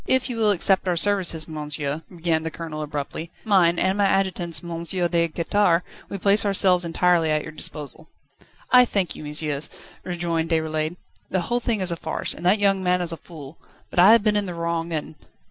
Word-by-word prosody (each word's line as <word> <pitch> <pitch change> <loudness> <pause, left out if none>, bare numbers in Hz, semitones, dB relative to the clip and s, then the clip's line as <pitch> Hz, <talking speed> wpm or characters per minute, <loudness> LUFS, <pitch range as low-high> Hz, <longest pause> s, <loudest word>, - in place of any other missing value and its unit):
"If 260 0 +2
you 235 - -5
will 220 -2 +3
accept 195 -1 +3
our 175 -1 +1
services, 175 -4 +1
monsieur," 150 -1 -4
began 165 -2 -1
the 160 - -4
Colonel 160 -2 -7
abruptly, 150 +2 -5 0.2
"mine, 180 -5 +3
and 190 +3 +1
my 200 - +4
adjutant's, 185 -4 0
M. 170 -1 -5
de 170 -1 0
Quettare, 170 +1 +1 0.3
we 200 - -4
place 200 +2 +4
ourselves 190 -3 +2
entirely 170 -1 +2
at 155 0 0
your 155 - -8
disposal." 155 0 -2 0.6
"I 250 0 +8
thank 200 -7 -1
you, - - -9
messieurs," 150 -1 -2 0.3
rejoined 170 -2 -2
Déroulède. 160 0 -1 0.3
"The 185 - 0
whole 240 +6 -1
thing 225 -4 -1
is 185 -1 -1
a - - -1
farce, 160 -1 -3
and - - -11
that 195 +4 +5
young 200 -2 +2
man 180 -1 +1
is 175 -2 -2
a - - -3
fool; 155 -3 -12 0.3
but - - -1
I 190 +4 +8
have 230 -3 +4
been 210 -1 +2
in 205 -1 0
the 175 - -6
wrong 170 0 -3
and 155 -1 -4
170 Hz, 200 wpm, -23 LUFS, 160-195 Hz, 0.6 s, I